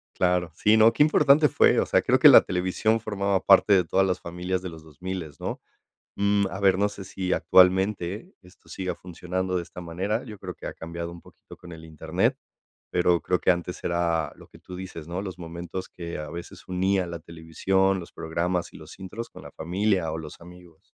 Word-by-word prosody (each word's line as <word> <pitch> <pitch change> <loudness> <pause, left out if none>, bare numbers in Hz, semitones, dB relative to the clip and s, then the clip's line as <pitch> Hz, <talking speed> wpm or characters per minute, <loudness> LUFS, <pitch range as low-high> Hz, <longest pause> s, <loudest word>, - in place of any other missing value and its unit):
Claro, 90 -2 +1
sí, 105 +5 +4
no, 110 +1 +6
qué - - +4
importante 150 0 +5
fue. - - +4
O - - +1
sea, - - +2
creo - - +2
que - - +8
la - - +10
televisión 95 +5 0
formaba 100 -3 -1
parte 100 +1 +6
de 95 -2 +5
todas 95 +3 +2
las 90 -1 -1
familias 90 +2 -4
de 95 - -6
los 80 -1 -12
dosmiles 80 -1 -7
¿no? - - -4 0.6
Mm, 100 0 +2
a 95 - -6
ver, 95 -2 +3
no 100 +1 +2
sé 100 -1 -9
si 95 -1 -3
actualmente 95 - +2
esto 90 0 -21
siga 95 -1 -4
funcionando 90 +1 -4
de 85 - -2
esta 90 +1 -11
manera, 95 +7 -3
yo 110 -4 -9
creo - - -7
que - - -8
ha - - -6
cambiado 85 +1 -6
un 85 0 -11
poquito - - -16
con 85 - -13
el 80 -1 -10
internet, 80 -2 -1 0.5
pero 90 -1 +2
creo 90 -1 0
que - - +4
antes 90 0 -4
era 85 -3 0
lo - - -16
que - - -18
tú 90 - -10
dices, 90 -4 -8
¿no? 90 +2 -4
Los 95 -3 -7
momentos 85 +2 -7
que 85 -1 -7
a 75 -1 -6
veces 85 +2 -9
unía 95 0 0
la 85 0 -6
televisión, 85 +4 0
los 85 - -10
programas 85 +2 -2
y - - -11
los 80 +3 -13
intros 105 +5 -7
con - - -13
la - - -11
familia 90 0 -1
o 80 - -4
los 80 -2 -9
amigos. 90 -1 -15
90 Hz, 210 wpm, -25 LUFS, 85-95 Hz, 0.6 s, la